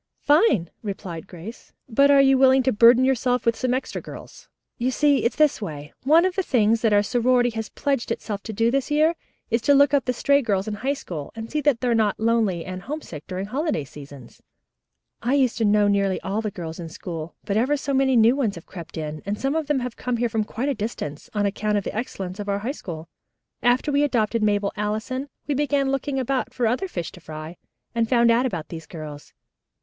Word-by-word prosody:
"Fine," 290 - +3
replied 190 -4 -6
Grace. 185 +6 -11
"But 275 +4 +4
are 280 -1 +7
you 270 0 +5
willing 265 0 +5
to 260 - +2
burden 235 +3 +6
yourselves 250 -2 +1
with 230 -1 +3
some 255 +1 -1
extra 255 +1 -2
girls? - - -11 0.3
You 245 +2 +1
see 285 +1 +2
it's 235 - +1
this 305 -5 +3
way. 150 -6 -7
One 320 +5 +5
of 375 - 0
the 385 - 0
things 230 - +2
that 225 - +2
our 205 0 +4
sorority 245 +2 +2
has 220 -1 -5
pledged 275 -4 -2
itself 210 -3 -3
to 225 - -4
do 225 +2 +1
this 275 +1 0
year 305 +3 +3 0.4
is 230 +1 +2
to 285 +4 +4
look 285 0 +5
up 280 - +3
the 250 - +1
stray 280 +3 +3
girls 200 -4 -1
in 215 - -2
High 265 +7 -1
School, 160 - -7
and 225 0 -7
see 300 - 0
that 280 -5 +2
they 250 - 0
are 240 - +3
not 215 -3 +1
lonely 220 -7 +1
and 185 0 -6
homesick 210 - -7
during 185 +1 -4
holiday 270 - -1
seasons. 140 -3 -13 0.8
I 250 +4 +1
used 255 -4 +2
to 225 - +2
know 205 0 +4
nearly 200 -2 +1
all 200 +3 -2
the 215 - -2
girls 170 -5 -7
in 165 -1 -6
school, 165 0 -7
but 200 - -1
ever 260 +7 +2
so 280 0 -3
many 265 -1 +3
new 230 +2 +5
ones 235 -8 0
have 170 - -10
crept 170 -2 -10
in, 155 -1 -5
and 205 +2 -3
some 270 +1 0
of 320 -2 -1
them 290 -3 +1
have 245 -1 -5
come 250 -1 -2
here 240 0 0
from 220 -1 -1
quite 240 +5 -3
a 285 - +1
distance, 205 - -5
on 205 -1 +1
account 210 +1 0
of 200 - -1
the - - -5
excellence 195 -5 -5
of 205 0 -4
our 200 - +1
High 260 - 0
School. 165 - -8 0.5
After 250 +5 +2
we 285 0 +2
adopted 230 -5 +1
Mabel 205 -1 +1
Allison, 220 +6 -3 0.2
we 290 - -1
began 280 -1 +1
looking 275 0 -2
about 265 0 0
us 250 - -25
for 245 - 0
other 250 +12 0
fish 175 - -5
to - - -13
fry, 155 +2 -8 0.4
and 230 -1 0
found 235 -2 +4
out 240 +3 +3
about 170 -10 -5
these 160 -2 -8
girls. 150 -3 -9
230 Hz, 230 wpm, -23 LUFS, 200-265 Hz, 0.8 s, are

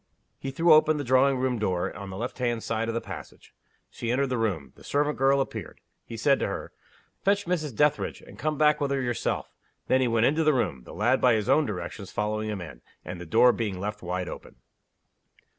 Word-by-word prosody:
He 135 - -4
threw 165 +5 +4
open 155 0 +5
the 145 - -2
drawing 130 +1 +4
room 125 -2 0
door, 90 -4 -1
on 100 0 -7
the 95 - -7
left 120 +4 -5
hand 120 -2 -1
side 115 0 -1
of 115 - -2
the 115 - -1
passage. 90 -7 -10 0.4
She 115 - -5
entered 135 +3 +1
the 125 - -1
room. 95 -11 -2
The - - -18
servant 145 +1 0
girl 135 +1 +3
appeared. 110 -8 -4 0.2
He 115 - -8
said 135 +5 +3
to - - 0
her, - - -5 0.5
"Fetch 200 +1 +2
Mrs. 155 -8 -2
Dethridge; 150 +2 +1
and - - -15
come 155 -1 -1
back 150 0 +4
with 140 - +1
her 140 0 0
yourself." 120 -2 -2 0.3
Then 130 - +3
he 130 - +2
went 115 0 +2
into 155 +5 +2
the 155 -2 +4
room; 70 - -1
the - - -10
lad, 120 +7 +2
by 125 -2 +5
his 105 -2 -1
own 140 +2 +4
directions, 95 0 -5
following 110 +1 -2
him 105 -3 -4
in; 70 -8 -9 0.2
and 90 0 -6
the 90 - -8
door 120 +7 +6
being 105 -5 -3
left 105 +2 -4
wide 90 0 -3
open. - - -9
120 Hz, 225 wpm, -27 LUFS, 105-140 Hz, 0.5 s, door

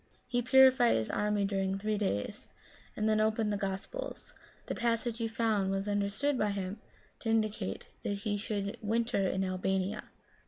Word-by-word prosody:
He 245 -1 0
purified 260 -1 +6
his 110 -1 -1
army 210 -1 +1
during 195 -1 0
three 210 +1 -1
days, 105 - -3 0.4
and 215 - +1
then 215 0 +3
opened 215 0 +1
the - - +1
Gospels. 195 - -5 0.3
The - - -3
passage 235 0 0
he 230 - 0
found 220 -3 +1
was 195 +1 -1
understood 205 +8 0
by 210 - +2
him 200 +1 -3 0.4
to 225 - -3
indicate 215 -3 0 0.2
that 200 - -2
he 210 -1 +1
should 205 +1 -3
winter 225 -2 +1
in 190 - 0
Albania. 190 +1 -1
210 Hz, 160 wpm, -32 LUFS, 195-225 Hz, 0.4 s, purified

